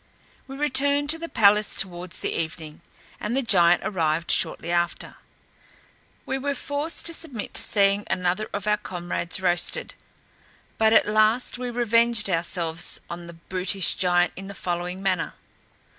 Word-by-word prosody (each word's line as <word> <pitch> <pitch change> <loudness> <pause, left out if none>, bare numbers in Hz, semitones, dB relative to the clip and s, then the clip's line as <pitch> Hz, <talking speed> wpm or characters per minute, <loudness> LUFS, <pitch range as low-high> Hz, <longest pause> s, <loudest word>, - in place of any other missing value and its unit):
We 270 0 -8
returned 285 +1 +2
to 325 - +3
the 335 0 -6
palace 210 -1 +4
towards 180 -2 -3
the - - -2
evening, 160 -1 -5 0.4
and 230 +5 -2
the 270 - +1
giant 175 -6 +4
arrived 165 -5 0
shortly 170 - +1
after. 170 0 -1 1.1
We 265 0 -2
were 280 +1 -2
forced 290 +5 -2
to 335 - +2
submit 280 -10 -6
to - - +3
seeing 200 0 +2
another 180 +3 -1
of 200 -1 -4
our 210 0 +2
comrades 175 -2 -4
roasted. 175 -1 +1 0.9
But 220 0 +4
at 225 - +5
last 215 +4 +2
we 250 -1 -3
revenged 235 -3 +2
ourselves 170 0 -1
on 170 0 -7
the 170 - -9
brutish 185 +2 0
giant 175 -1 +2
in 195 +1 -8
the 200 - -8
following 180 +1 -4
manner. 185 -3 -1
195 Hz, 150 wpm, -24 LUFS, 175-235 Hz, 1.1 s, at